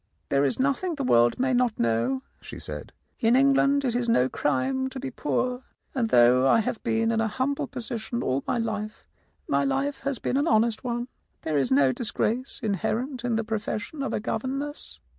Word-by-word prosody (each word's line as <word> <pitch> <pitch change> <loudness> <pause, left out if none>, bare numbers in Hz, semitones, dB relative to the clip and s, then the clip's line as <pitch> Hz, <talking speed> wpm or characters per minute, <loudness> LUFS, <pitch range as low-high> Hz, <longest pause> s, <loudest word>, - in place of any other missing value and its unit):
"There 140 0 +3
is 140 - +1
nothing 280 +6 0
the 280 - -3
world 120 - +4
may 260 0 +2
not 245 -2 +2
know," 115 - 0 0.2
she - - -9
said; - - -6 0.3
"in 230 +2 +4
England 275 +1 +4
it 245 - +1
is 240 -1 0
no 130 - +4
crime 260 - 0
to 265 - -7
be 265 0 -5
poor, 250 -2 -1 0.3
and 235 -5 0
though 125 - +5
I 225 - +5
have 220 - -3
been 225 -1 +1
in 225 0 +1
a 225 - +1
humble 260 +6 -1
position 240 -2 -4
all 130 +2 0
my - - +1
life, 215 -2 -4 0.4
my - - +2
life 275 +1 -1
has 280 -2 -2
been 255 - -1
an 290 +3 +1
honest 220 -1 +2
one. 240 -1 -2 0.4
There 155 -2 +1
is 135 - +1
no 135 0 +5
dis 230 - -4
grace 250 +4 -1
inherent 235 - -2
in 240 -2 0
the 225 - 0
profession 220 +5 -4
of 275 - -2
a - - -1
governess. 265 - -4
235 Hz, 200 wpm, -26 LUFS, 215-265 Hz, 0.4 s, though